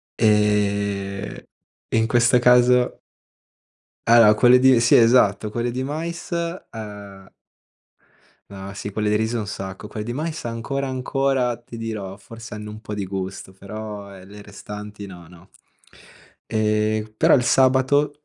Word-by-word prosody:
Ehm, 100 -2 0 0.4
e - - 0
in 110 0 +2
questa 120 +1 +3
caso 125 0 +4 1.1
allora 115 -2 +7
quelle 125 +3 +6
di 130 -2 +5
sì, 115 - +5
esatto, 115 -3 +4
quelle 120 +2 -2
di 130 +2 -3
mais, 165 +5 -5
ehm 105 - -6 1.2
No, 100 0 -9
sì, 105 +1 -6
quelle 105 0 -1
di 105 - +2
riso 110 +2 -1
un 105 - -4
sacco. 95 +1 -7
Quelle 105 -1 -6
di 120 - -4
mais 155 +3 -4
ancora 120 +4 -3
ancora, 130 -1 0
ti 120 -1 -12
dirò, 105 -3 -6
forse 115 +2 -12
hanno 105 0 -7
un 110 +1 -11
po' 105 - -8
di 100 -2 -3
gusto, 95 0 -6
però 100 0 -8
ehm 95 0 -14
le 105 0 -12
restanti 105 0 -9
no, 90 -3 -12
no. 90 +3 -17 1.0
Ehm, 110 0 0
però - - +5
il 125 - +3
sabato 135 +4 +2
110 Hz, 145 wpm, -22 LUFS, 100-125 Hz, 1.2 s, allora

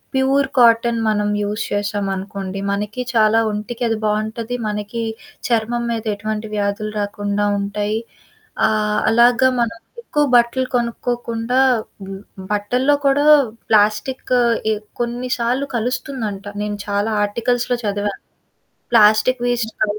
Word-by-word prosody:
Pure 270 +1 +2
cotton 230 0 +4
మనం 210 -1 +1 0.2
use 210 +2 -2
చేశామనుకోండి, 195 -1 -3
మనకి 210 +4 -3
చాలా 220 0 +4
ఒంటికది 225 +2 -2
బావుంటది. 220 +3 -2
మనకీ 210 +2 -3 0.5
చర్మం 235 +1 0
మీద 225 0 -3
ఎటువంటి 215 +1 -4
వ్యాధులు 205 +1 -1
రాకుండా 205 0 -1
ఉంటాయి. 205 +2 -2 0.7
ఆహ్, 210 -1 +1
అలాగ 235 +1 +5 0.2
మనం 230 0 -1 0.2
ఎక్కువ 295 -10 0
బట్టలు 240 +2 +3
కొనుక్కోకుండా, 240 0 -1 0.4
హ్మ్, 195 - -9 0.3
హ్మ్, 190 - -9
బట్టల్లో 250 +8 +2
కూడా 275 +1 +3 0.4
ప్లాస్టిక్ 215 +5 +2 0.4
ఎ - - +3 0.3
కొన్ని 240 +1 -3
సార్లు 250 +4 0
కలుస్తుందంట. 235 -4 -3 0.2
నేను 205 0 -3
చాలా 205 +2 0
ఆర్టికల్స్‌లో 245 +3 0
చదివాను. 205 -1 -2 0.7
ప్లాస్టిక్ 225 +3 +5
వేస్ట్ 235 -2 -1
కానీ 210 0 0
220 Hz, 115 wpm, -19 LUFS, 205-240 Hz, 0.7 s, అలాగ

